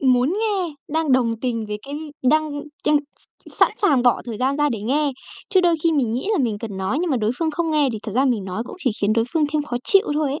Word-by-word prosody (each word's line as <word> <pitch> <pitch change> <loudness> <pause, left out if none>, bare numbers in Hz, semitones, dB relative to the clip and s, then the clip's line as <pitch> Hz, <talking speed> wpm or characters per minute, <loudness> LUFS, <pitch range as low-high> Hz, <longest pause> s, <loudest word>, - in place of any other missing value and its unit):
muốn 255 -1 +3
nghe, 390 -8 -1
đang 315 -2 0
đồng 230 -3 +2
tình 230 -3 -2
với 210 0 -4
cái 285 - -6 0.3
đang 290 +1 +1 0.2
chăn 300 - +4 0.2
s - - -20
sẵn - - +4
sàng 280 -10 +4
bỏ 245 -1 +3
thời 230 -3 -6
gian 270 +2 +1
ra 295 0 +2
để 225 -6 -3
nghe. 280 +5 +1 0.4
Chứ 375 - +4
đôi 345 -2 +3
khi 335 - +3
mình 255 -7 +1
nghĩ 255 - -2
là 405 - +1
mình 230 -7 0
cần 210 -4 -6
nói, 190 +9 -1
nhưng 355 -2 -1
mà 265 - +2
đối 215 -1 0
phương 325 -1 0
không 325 +1 -1
nghe 300 -3 +3
thì 220 - -4
thật 215 - -6
ra 265 +3 +3
mình 230 -7 +1
nói 190 +4 -3
cũng - - -9
chỉ 280 -9 0
khiến 205 +1 +2
đối 230 0 +2
phương 320 -2 +2
thêm 305 -1 +1
khó 250 -4 -4
chịu 395 +1 +4
thôi 295 -2 0
ấy. 290 - -3
275 Hz, 275 wpm, -22 LUFS, 230-310 Hz, 0.4 s, chăn